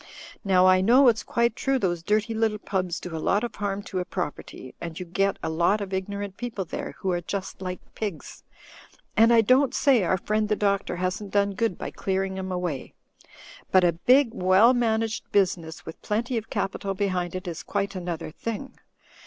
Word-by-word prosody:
Now 185 -2 +4
I 185 0 +6
know 245 +6 +6
it's 225 -1 +1
quite 235 -1 0
true 270 +1 +1
those 175 -7 -1
dirty 215 +5 0
little 220 -1 +1
pubs 185 -4 -2
do 175 -2 -7
a 160 - -4
lot 205 +7 +1
of 240 - -3
harm 205 0 -3
to 185 - -4
a - - 0
property, 160 -7 -6
and 165 -1 -6
you 180 - -5
get 195 +3 0
a - - -1
lot 170 +6 +2
of 195 -2 -5
ignorant 200 +1 -4
people 235 -6 -4
there - - -6
who 190 - -1
are 175 -1 -1
just 190 +2 -5
like 180 -1 -4
pigs; 205 -7 -6 0.7
and 225 +1 +6
I 230 -1 +7
don't 255 +5 +3
say 265 -5 +4
our 185 +2 +2
friend 215 +3 -1
the 210 - +2
Doctor 200 -3 0
hasn't 185 +3 -3
done 200 0 +1
good 210 -2 -1
by - - -5
clearing 190 0 -2
'em 190 0 -4
away. 180 -7 -4 0.7
But 185 -1 +5
a 175 - +5
big, 250 - +4
well 190 +4 +5
managed 225 -2 -1
business 175 -5 0
with 160 - -9
plenty 235 +4 -1
of 225 -1 -3
capital 195 0 -2
behind 185 -3 -1
it 185 +1 -5
is 170 -2 -5
quite 200 -1 -2
an 180 -1 -5
other 165 -2 -4
thing. 230 - -6
195 Hz, 200 wpm, -26 LUFS, 180-220 Hz, 0.7 s, I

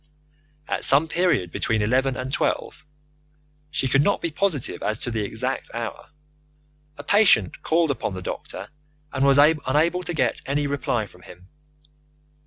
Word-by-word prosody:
At - - -2
some 145 +4 +4
period 165 - +1
between 110 +4 0
eleven 130 +4 +1
and 130 +1 -5
twelve - - -1 0.9
(she 135 - -1
could 135 +2 +3
not 200 +8 +2
be 170 - -3
positive 155 -5 -1
as 110 - -1
to 120 - -4
the 110 -1 -1
exact 100 - -3
hour) - - -5 0.9
a 145 - -8
patient 165 - +4
called 165 -1 +2
upon 115 -7 -3
the 95 - -7
doctor - - -6 0.4
and 135 -1 0
was 140 0 +5
unable 150 +3 +3
to 175 -1 -4
get 130 -5 0
any 145 +1 0
reply 140 -5 -1
from 90 -2 -18
him. 90 +1 -15
135 Hz, 155 wpm, -23 LUFS, 115-160 Hz, 0.9 s, was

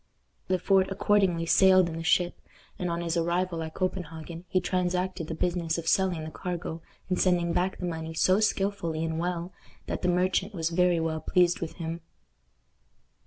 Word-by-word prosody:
Le 185 - +3
Fort 190 +1 +3
accordingly 195 -4 +2
sailed 185 +1 +5
in 165 - -5
the 165 - -5
ship, 175 +1 +1 0.4
and 180 -2 -1
on 170 0 -2
his 170 0 -1
arrival 170 0 0
at 160 0 -6
Copenhagen 170 -2 -4
he 185 - +2
transacted 180 -1 -1
the 165 - -4
business 170 -1 -1
of 165 -1 -5
selling 180 -3 +2
the 155 - -6
cargo 175 -2 -5 0.3
and 180 -1 0
sending 175 -2 +2
back 185 +2 0
the 180 - -4
money 160 -1 -4
so 185 +4 +3
skillfully 195 -6 0
and 160 0 -2
well 175 +1 -3 0.3
that - - -4
the 180 - +1
merchant 185 +3 +1
was 165 -1 -1
very 180 0 +3
well 160 -1 -1
pleased 175 -1 +2
with 165 - -4
him. 165 0 -5
175 Hz, 175 wpm, -28 LUFS, 165-185 Hz, 0.4 s, sailed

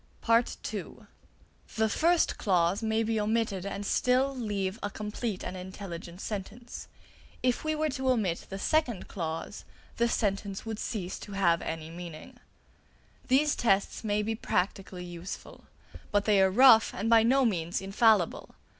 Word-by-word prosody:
(b) 230 0 +6 1.3
The 220 -1 +2
first 335 +10 +2
clause 180 -1 +2
may 220 0 +1
be 225 0 0
omitted 210 -3 0
and 200 +1 -4
still 260 +5 +2
leave 205 -4 -2
a 205 - -2
complete 210 0 -4
and 180 - -5
intelligent 180 -1 -8
sentence; 220 +4 -6 0.6
if 250 -1 +1
we 310 0 0
were 310 0 0
to 260 0 -1
omit 205 -9 0
the 195 - -5
second 245 -2 0
clause, 165 -3 -5 0.3
the 235 - +3
sentence 200 -2 -1
would 220 -1 -4
cease 190 -5 -4
to 205 - -9
have 170 -4 +2
any 160 0 -5
meaning. 170 -2 -9 0.9
These 290 +3 +3
tests 195 -2 +1
may 210 -1 0
be 225 +1 -1
practically 190 -3 -2
useful; 175 +1 -8 0.5
but 205 0 +2
they 205 -3 +4
are 190 - +5
rough 225 +1 +6
and 205 +4 -2
by 230 -1 +6
no 260 +4 +4
means 175 -5 0
infallible. 195 -1 +2
205 Hz, 145 wpm, -29 LUFS, 185-230 Hz, 1.3 s, b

